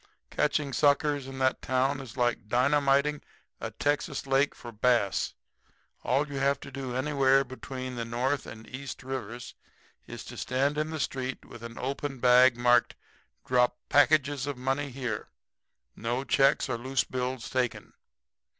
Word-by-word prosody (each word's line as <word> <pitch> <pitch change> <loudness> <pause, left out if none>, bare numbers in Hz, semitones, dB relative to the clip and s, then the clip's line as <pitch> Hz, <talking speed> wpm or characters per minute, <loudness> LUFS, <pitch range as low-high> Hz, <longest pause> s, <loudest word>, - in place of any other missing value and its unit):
Catching 150 -2 0
suckers 145 0 +2
in 135 0 -8
that 130 0 +1
town 130 +2 +1
is 130 -2 -10
like 120 -3 0
dynamiting 140 +4 +2 0.4
a - - -4
Texas 145 0 -1
lake 135 +1 +2
for 120 - -9
bass. 115 -3 +1 0.7
All 140 +4 +1
you 140 -2 -4
have 140 0 +2
to 140 - -9
do 130 -2 -5
anywhere 135 0 +3
between 130 -1 -7
the 120 -1 -3
North 125 +4 -1
and 110 0 -10
East 135 +1 -7
rivers 125 -2 -6 0.5
is - - -8
to - - -10
stand 135 +3 0
in 155 0 -1
the 160 0 -4
street 130 -1 -3
with 120 - -12
an 115 0 -8
open 135 +1 -3
bag 125 0 +6
marked, 120 0 +3 0.5
'Drop 125 -1 +2
packages 145 -2 +3
of 145 -2 -3
money 135 +3 -1
here. 125 -5 -4 0.7
No 120 +3 -2
checks 135 0 +3
or 115 - -2
loose 130 +2 0
bills 130 -1 -3
taken.' 125 -2 -2
130 Hz, 150 wpm, -28 LUFS, 125-140 Hz, 0.7 s, bag